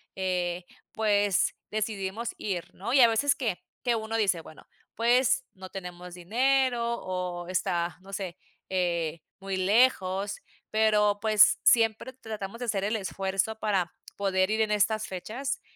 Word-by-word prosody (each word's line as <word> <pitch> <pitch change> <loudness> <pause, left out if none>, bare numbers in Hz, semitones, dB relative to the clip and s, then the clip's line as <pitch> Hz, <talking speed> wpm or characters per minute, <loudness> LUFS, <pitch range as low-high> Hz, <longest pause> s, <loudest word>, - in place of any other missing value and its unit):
eh, 180 -1 -1 0.3
pues, 205 -3 +2 0.2
decidimos 215 +1 -3
ir, 185 -5 -4
¿no? 225 +7 -4
Y 270 - +7
a 235 - +9
veces 280 +6 +3
que 230 -10 -2 0.2
que 240 -2 +2
uno 220 0 -3
dice: 190 -6 +1
"Bueno, 155 - -15 0.3
pues, 245 +3 +3
no 185 -1 -10
tenemos 180 -1 -8
dinero, 245 +6 +1 0.2
o, 180 -1 -4
está 175 -1 -1
no 195 +1 -13
sé, 185 -3 -4 0.3
eh, 170 -4 -1 0.2
muy 195 -1 -3
lejos", 195 -1 +2 0.3
pero, 210 -1 +3
pues, 215 -2 +5
siempre 230 +2 +3
tratamos 220 -3 -7
de 245 - -3
hacer 200 -4 -1
el 215 +2 0
esfuerzo 195 +2 -2
para 190 -5 0 0.2
poder 190 0 +1
ir 220 - 0
en 215 -1 +1
estas 215 +1 +1
fechas, 240 +9 -4
205 Hz, 145 wpm, -28 LUFS, 185-225 Hz, 0.3 s, a